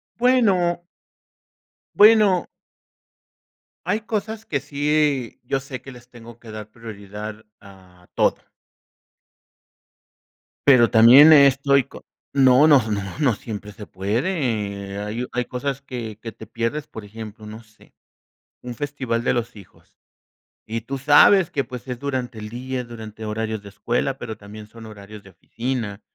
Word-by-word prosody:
Bueno. 195 Hz, -9 st, +2 dB, 1.1 s
Bueno. 210 Hz, -3 st, +5 dB, 1.4 s
Hay 215 Hz, -, -1 dB
cosas 220 Hz, 0 st, -4 dB
que 150 Hz, -10 st, -2 dB
sí, 145 Hz, -3 st, -1 dB
yo 135 Hz, +2 st, -1 dB
sé 135 Hz, -2 st, -8 dB
que 135 Hz, -, -11 dB
les 125 Hz, 0 st, -15 dB
tengo 120 Hz, -1 st, -14 dB
que 115 Hz, -, -12 dB
dar 110 Hz, 0 st, -8 dB
prioridad 105 Hz, -1 st, -9 dB, 0.2 s
a 95 Hz, -3 st, -18 dB
toda. -, -, 0 dB, 2.2 s
Pero 125 Hz, -5 st, +6 dB
también 125 Hz, +7 st, +8 dB
eh, 140 Hz, -2 st, +8 dB
estoy 140 Hz, 0 st, +2 dB
co -, -, -14 dB, 0.3 s
no, 135 Hz, +2 st, +5 dB
no, 145 Hz, -4 st, +6 dB
no, 100 Hz, -1 st, -1 dB, 0.2 s
no 135 Hz, -7 st, +3 dB
siempre 105 Hz, -1 st, -8 dB
se 105 Hz, 0 st, -11 dB
puede. 105 Hz, -, -2 dB
Hay 110 Hz, +4 st, -4 dB
hay 125 Hz, 0 st, -2 dB
cosas 135 Hz, +3 st, -4 dB
que 115 Hz, -5 st, -7 dB
que 115 Hz, -, -7 dB
te 110 Hz, -, -12 dB
pierdes, 115 Hz, +8 st, -3 dB
por 110 Hz, -, -10 dB
ejemplo, 110 Hz, +1 st, -10 dB
no 110 Hz, +2 st, -10 dB
sé. 110 Hz, -1 st, -24 dB, 0.7 s
Un 125 Hz, -1 st, -7 dB
festival 130 Hz, -4 st, -3 dB
de -, -, +1 dB
los 120 Hz, 0 st, -3 dB
hijos. 100 Hz, -3 st, -18 dB, 0.7 s
Y 115 Hz, +1 st, -3 dB
tú 135 Hz, +4 st, -5 dB
sabes 150 Hz, +6 st, +5 dB
que, 140 Hz, -, -1 dB
pues, 125 Hz, +1 st, -9 dB
es 125 Hz, -1 st, -5 dB
durante 130 Hz, -5 st, -4 dB
el 105 Hz, 0 st, -7 dB
día, 125 Hz, +2 st, -5 dB
durante 110 Hz, -2 st, -9 dB
horarios 110 Hz, 0 st, -3 dB
de 100 Hz, -, -11 dB
escuela, 120 Hz, +6 st, -2 dB
pero 115 Hz, -3 st, -7 dB
también 105 Hz, +1 st, -11 dB
son 115 Hz, +1 st, -13 dB
horarios 105 Hz, 0 st, -12 dB
de 100 Hz, -, -15 dB
oficina. 115 Hz, +2 st, -5 dB
120 Hz, 145 wpm, -22 LUFS, 110-140 Hz, 2.2 s, también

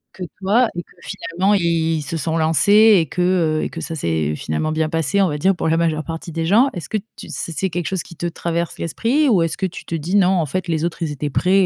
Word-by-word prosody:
que 185 Hz, -, -6 dB, 0.2 s
toi 210 Hz, +6 st, +3 dB
et 175 Hz, -, -2 dB
que -, -, -28 dB
finalement, 195 Hz, -1 st, -1 dB
i 165 Hz, -4 st, +1 dB
ils -, -, -3 dB
se 145 Hz, +3 st, -5 dB
sont 160 Hz, +1 st, -1 dB
lancés 205 Hz, +8 st, +5 dB
et 165 Hz, -, +1 dB
que, 180 Hz, -, -4 dB
heu, 170 Hz, -4 st, +2 dB
et -, -, -2 dB
que 165 Hz, -, -7 dB
ça 165 Hz, -, -5 dB
s'est 80 Hz, -, -1 dB
finalement 80 Hz, -, -2 dB
bien 155 Hz, 0 st, 0 dB
passé, 165 Hz, +5 st, +1 dB
on 195 Hz, -, +4 dB
va 150 Hz, -3 st, -2 dB
dire, 190 Hz, +6 st, +3 dB
pour -, -, -2 dB
la 160 Hz, -, +2 dB
majeure 160 Hz, -2 st, 0 dB
partie 165 Hz, +1 st, -6 dB
des 165 Hz, 0 st, -2 dB
gens? 225 Hz, +10 st, +4 dB
Est-ce 170 Hz, -6 st, -6 dB
que 215 Hz, -, 0 dB, 0.2 s
tu -, -, -9 dB
c'est -, -, -5 dB
c'est 190 Hz, +4 st, -1 dB
quelque 175 Hz, 0 st, -3 dB
chose 190 Hz, -2 st, -2 dB
qui 170 Hz, -, -13 dB
te 165 Hz, -, -5 dB
traverse 170 Hz, 0 st, -3 dB
l'esprit 245 Hz, -, +1 dB
ou 205 Hz, -9 st, +4 dB
est-ce 165 Hz, -1 st, -1 dB
que 195 Hz, -, -1 dB
tu 180 Hz, -, -6 dB
te -, -, -8 dB
dis: 165 Hz, +5 st, -2 dB
«Non 190 Hz, -3 st, +5 dB
en 165 Hz, -, +1 dB
fait, 185 Hz, +6 st, -3 dB
les 160 Hz, 0 st, 0 dB
autres 175 Hz, 0 st, -4 dB
ils 160 Hz, -3 st, -1 dB
étaient 145 Hz, +1 st, -3 dB
prêts 185 Hz, +7 st, +3 dB
170 Hz, 280 wpm, -20 LUFS, 160-190 Hz, 0.2 s, lancés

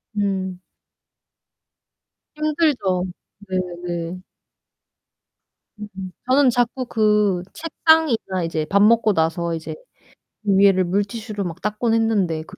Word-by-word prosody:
음. 190 Hz, -3 st, -2 dB, 1.8 s
힘들죠. 295 Hz, -, +1 dB, 0.4 s
네네. 175 Hz, -1 st, -4 dB, 1.6 s
음 210 Hz, -1 st, -8 dB, 0.4 s
저는 265 Hz, 0 st, +5 dB
자꾸 245 Hz, +1 st, 0 dB
그 210 Hz, -5 st, +2 dB
책상이나 320 Hz, -, +1 dB
이제 160 Hz, -2 st, -2 dB
밥 200 Hz, +5 st, +2 dB
먹고 220 Hz, -1 st, +4 dB
나서 165 Hz, +1 st, 0 dB
이제 160 Hz, -1 st, -5 dB, 0.7 s
위에를 195 Hz, -2 st, +4 dB
물티슈로 205 Hz, +3 st, -2 dB
막 175 Hz, -1 st, -6 dB
닦곤 210 Hz, +2 st, -1 dB
했는데 205 Hz, -8 st, +1 dB
그 -, -, -14 dB
200 Hz, 185 characters per minute, -21 LUFS, 180-230 Hz, 1.8 s, 저는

